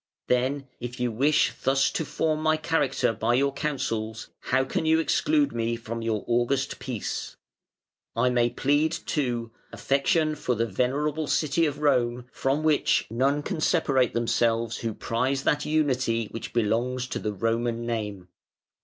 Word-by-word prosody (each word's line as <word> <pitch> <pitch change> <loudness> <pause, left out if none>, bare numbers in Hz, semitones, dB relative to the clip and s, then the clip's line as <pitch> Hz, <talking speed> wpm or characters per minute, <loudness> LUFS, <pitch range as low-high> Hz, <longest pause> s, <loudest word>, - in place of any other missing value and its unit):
Then, 130 +3 0
if 125 +1 -6
you 125 -1 0
wish 135 +2 +2
thus 135 +1 +2
to - - -1
form 155 +1 -1
my 155 0 +2
character 145 -6 +1
by 115 +3 +1
your 140 +2 +2
counsels, 115 -7 -3
how 130 - +1
can 130 - -2
you 160 0 +5
exclude 290 - +2
me 115 0 -1
from 115 0 -6
your 110 -2 -1
august 120 +3 0
peace? 120 -6 -4 0.8
I 125 +2 +2
may 120 -1 +3
plead, 145 +5 +1
too, 120 -8 -2 0.2
affection 155 +3 +1
for 125 -4 -1
the 115 +1 +1
venerable 145 +8 -1
city 155 +3 +2
of 145 0 -5
Rome, 125 -4 +1
from 140 +3 -1
which 155 -2 +2
none 135 +5 +1
can 175 -3 -3
separate 135 -9 +2
themselves 115 -1 +1
who 115 -2 -3
prize 130 +4 -1
that 150 0 +1
unity 130 -7 +1
which 115 - -6
belongs 120 +3 0
to - - -3
the 105 - -2
Roman 115 +3 -1
name. 105 -6 -4
125 Hz, 155 wpm, -26 LUFS, 115-145 Hz, 0.8 s, you